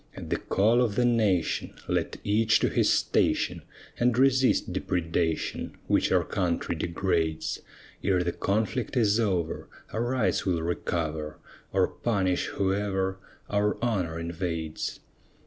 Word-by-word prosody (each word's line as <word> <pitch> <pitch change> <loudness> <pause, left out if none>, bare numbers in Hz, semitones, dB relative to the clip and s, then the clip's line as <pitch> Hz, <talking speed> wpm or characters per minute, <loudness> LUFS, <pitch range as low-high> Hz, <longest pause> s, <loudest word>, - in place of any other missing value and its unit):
At - - -7
the - - +2
call 110 +5 +3
of 115 -5 +1
the 125 - +3
nation, 105 -8 +1
Let - - -1
each 110 +2 +3
to - - +3
his - - +2
station, - - +1 0.4
And 120 -1 +3
resist 130 -7 +3
depredation, 85 -3 -1
Which - - +2
our - - +4
country 90 -3 -1
degrades; 85 -1 -1 0.4
Ere 95 -2 +2
the 85 - 0
conflict 110 +7 -1
is 110 -2 +3
over, 90 -7 -1 0.3
Our 110 - -1
rights 125 -2 +1
we'll 85 -4 0
recover, 80 -3 -2 0.3
Or 95 -1 +3
punish 95 -6 0
whoever 95 -1 -1 0.3
Our 105 0 +1
honor 95 -9 -1
invades. 85 -2 -3
95 Hz, 130 wpm, -27 LUFS, 85-110 Hz, 0.4 s, our